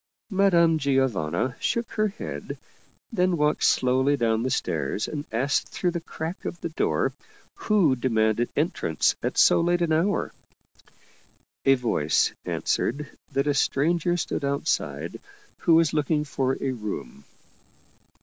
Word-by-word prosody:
Madame 170 -5 +4
Giovanna 130 - 0
shook 235 -1 -1
her 215 0 +1
head, 205 +3 -6 0.5
then 180 -5 +1
walked 150 0 +1
slowly 130 +3 +3
down 115 -3 +1
the 130 - -1
stairs, 80 - -1
and 150 -1 -5
asked 130 +5 0
through 180 - -1
the 170 -1 -4
crack 165 +2 -6
of 170 - -5
the - - -3
door 160 - 0 0.4
who 210 - +2
demanded 115 -2 +1
entrance 150 - +1
at - - -3
so - - +5
late 175 +1 +1
an 165 - 0
hour. 180 +6 0 1.3
A 135 - +6
voice 115 - +1
answered 140 +3 -2 0.2
that 140 +1 +1
a 145 - +2
stranger 170 +5 +1
stood 160 - -3
outside 140 +3 -2 0.4
who 165 - +4
was 165 -2 +3
looking 150 0 +1
for 135 -2 -1
a 135 - -1
room. 105 - -6
145 Hz, 135 wpm, -25 LUFS, 125-170 Hz, 1.3 s, A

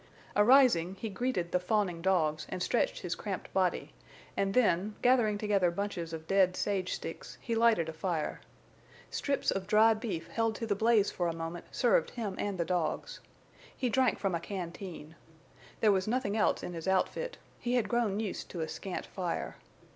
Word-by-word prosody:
Arising, 210 -6 +5
he 220 +3 -5
greeted 195 -4 -2
the 180 - +2
fawning 180 -2 0
dogs 155 -5 +1
and 180 - -3
stretched - - 0
his - - -2
cramped - - -5
body, - - 0 0.4
and 195 0 0
then, 210 -4 +2
gathering 240 -4 +4
together 205 -4 +2
bunches 175 -2 -3
of 160 -1 -6
dead 190 0 +3
sage 190 -3 -1
sticks, - - -7
he 235 - -3
lighted 225 -7 +3
a 160 - -5
fire. 160 -2 -2 0.7
Strips 280 -1 0
of 190 -1 -3
dried 215 +1 +5
beef 200 -8 -4
held 225 -1 0
to 230 - -4
the 215 - +1
blaze 220 0 +3
for 175 - -1
a 165 - -2
moment 165 +1 -5
served - - +2
him 215 -6 -4
and 200 -2 -2
the 170 - 0
dogs. 170 -2 -2 0.6
He 250 - 0
drank 260 +1 +2
from 195 -3 -1
a 170 - 0
canteen. 170 -3 -7 0.7
There 215 - +5
was 190 0 +1
nothing 220 -3 0
else 215 - +2
in 180 - -5
his 165 +1 -6
outfit; 475 - 0 0.2
he 245 +1 -1
had 235 -5 +2
grown 215 -3 +1
used 215 -4 -4
to 170 - -5
a 160 - -1
scant 185 +3 -5
fire. 180 -3 -4
195 Hz, 180 wpm, -31 LUFS, 175-225 Hz, 0.7 s, Arising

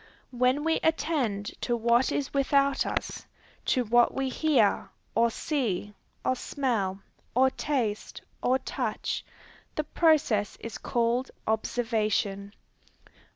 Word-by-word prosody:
When 255 +3 +2
we 325 0 +2
attend 270 -11 0
to 240 -1 0
what 235 +2 +3
is 280 - -2
without 275 0 +2
us, - - -3 0.4
to 250 - +2
what 240 +1 +3
we 270 -1 0
hear, 260 -8 +2 0.2
or 235 0 +4
see, 220 - -2 0.3
or 255 - +2
smell, 220 -9 -1 0.3
or 260 +1 +5
taste, 240 -10 -2 0.2
or 255 +1 +3
touch, 260 - -3 0.5
the 305 - 0
process 295 -10 +2
is 230 - -7
called 240 +2 0 0.2
observation. 215 -3 0
245 Hz, 110 wpm, -28 LUFS, 220-275 Hz, 0.5 s, or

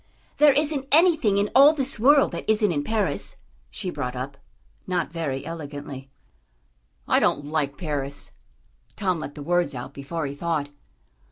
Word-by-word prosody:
"There 295 -2 +6
isn't 290 -1 0
anything 315 - +4
in 205 +1 +1
all 280 +3 +8
this 275 -4 -2
world 280 +4 +5
that - - -6
isn't 215 -2 +3
in 145 -3 -1
Paris," 220 +4 -2 0.3
she 185 -3 -4
brought 125 -5 -4
up, 130 +2 -5 0.5
not 180 -4 -1
very 145 -6 -3
elegantly. 145 -4 -7 1.0
"I - - +4
don't 145 - +1
like 145 -2 -2
Paris." 145 -4 -4 0.6
Tom 185 -5 0
let 145 - -7
the 145 - -7
words 175 -3 +1
out 125 +2 -7
before 150 +4 -4
he 140 - -4
thought. 150 -1 -2
165 Hz, 155 wpm, -24 LUFS, 145-220 Hz, 1.0 s, all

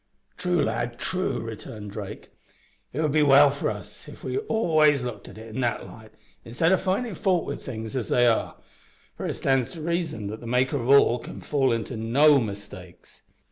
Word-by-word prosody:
"True, 180 -2 0
lad, 120 +2 -2
true," 185 +7 -1
returned 110 -2 -8
Drake. 100 -1 -8 0.6
"It 145 - -2
would 150 - +1
be 155 +1 +3
well 140 0 +7
for 140 - -2
us - - -9
if - - -12
we - - -2
always 155 - +2
looked 110 -5 -6
at - - -12
it 110 0 -10
in 130 - -2
that 120 -2 -1
light, 110 -1 -13 0.3
instead 120 +9 +1
o' 190 - +5
findin' 195 +5 -1
fault 180 0 +1
wi' 140 - -3
things 110 -2 -7
as 125 -5 -3
they 120 - +4
are, 115 -2 +1 0.6
for - - -4
it - - -2
stands 135 -3 0
to 165 - -8
reason 165 - -2
that 110 +2 -5
the 120 - -9
Maker 130 +4 +1
of 120 -1 -3
all 135 -3 +6
can - - -9
fall 135 -3 +1
into 115 +1 -2
no 140 +6 +4
mistakes." 100 -5 -8
130 Hz, 195 wpm, -25 LUFS, 110-155 Hz, 0.6 s, well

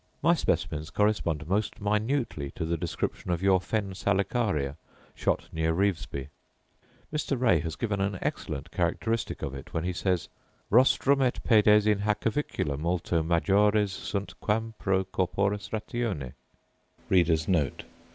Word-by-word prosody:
My - - +6
specimens 75 0 -1
correspond 85 -7 0
most 105 +4 -1
minutely 105 - -1
to 80 - -3
the 85 +1 0
description 85 +1 -3
of 85 +1 -1
your 95 -2 +4
fen 100 -1 -2
salicaria, 100 - 0 0.4
shot - - -1
near 80 0 0
Revesby. 85 -8 -1 0.8
Mr. 145 -3 -1
Ray 110 -10 +4
has 80 0 -4
given 105 -1 -1
an 100 0 -1
excellent - - -4
characteristic 115 0 -1
of 70 - -3
it 70 0 -9
when 80 - 0
he 90 +1 -1
says, 90 -2 0 0.4
'Rostrum 135 +4 +5 0.2
& - - -9
pedes 105 -2 +6
in 105 -2 +3
hac 105 0 0
avicula 110 - -1
multo 85 0 0
majores 100 +5 +3
sunt 100 -1 -4
quam 110 +2 -1
pro 95 -1 +1
corporis 100 +2 -1
ratione. 105 - -3
100 Hz, 130 wpm, -28 LUFS, 85-105 Hz, 0.8 s, My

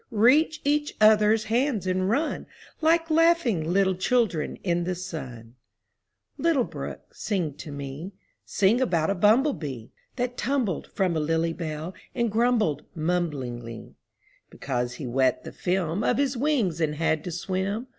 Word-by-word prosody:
Reach 270 +8 +3
each 295 +1 +1
other's 215 0 +5
hands 230 - 0
and 185 +1 0
run 295 +8 -1 0.3
Like 330 +1 +3
laughing 310 - +3
little 190 0 +3
children 185 -4 0
in 175 -2 0
the 180 +1 -2
sun! 130 -10 -7 0.9
Little 325 -6 +3
brook, - - -8
sing 180 -8 -2
to 150 - -8
me: 140 +6 -7 0.3
Sing 205 +6 +2
about 170 -8 +1
a - - +2
bumblebee 200 - +1 0.3
That 245 -1 -2
tumbled 245 - -1
from 185 -3 0
a - - +1
lily 165 +2 0
bell 160 +1 -5 0.2
and 235 -3 0
grumbled 220 - +1
mumblingly, 140 -9 -3 0.6
Because 125 -2 -3
he 135 - -6
wet 130 +1 +1
the - - -8
film 180 +1 -1
Of - - +2
his 275 -1 +1
wings 235 - 0
and 150 -1 0
had 160 -1 0
to 180 - -4
swim. 190 +6 -2
185 Hz, 145 wpm, -26 LUFS, 155-240 Hz, 0.9 s, other's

